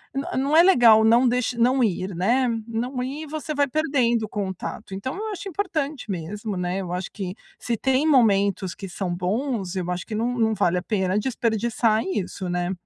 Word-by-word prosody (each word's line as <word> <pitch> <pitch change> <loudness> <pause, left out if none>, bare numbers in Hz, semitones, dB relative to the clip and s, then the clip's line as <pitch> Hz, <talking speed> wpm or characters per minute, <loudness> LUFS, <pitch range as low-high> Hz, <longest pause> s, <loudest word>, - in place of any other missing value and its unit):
n 275 +2 -2
não 280 +4 +2
é 335 - +8
legal 235 - +6
não 235 +3 +5
deix 250 0 0
não 250 +2 +2
ir, 190 -3 -1
né, 240 +8 +2 0.2
não 250 +3 -3
ir, 290 +5 -5
você 310 +1 -4
vai 285 0 +2
perdendo 255 -6 +1
o 215 - -5
contato. 195 0 -5
Então 230 +8 -4
eu 435 +1 -4
acho 390 0 -6
importante 310 - -3
mesmo, 195 +4 -4
né, 180 +1 -2
eu 175 -2 -6
acho 180 +1 -4
que 190 -2 -5 0.2
se 235 -1 -2
tem 265 +5 +1
momentos 200 - +3
que 195 - -8
são 180 0 -3
bons, 195 +1 -2
eu 180 -1 -2
acho 180 - -3
que 215 - -5
não 235 +3 0
não 220 -1 +2
vale 180 -2 +1
a - - -9
pena 190 -2 0
desperdiçar 225 -1 0
isso, 190 -1 -3
né. 175 0 -1
225 Hz, 195 wpm, -24 LUFS, 190-260 Hz, 0.2 s, é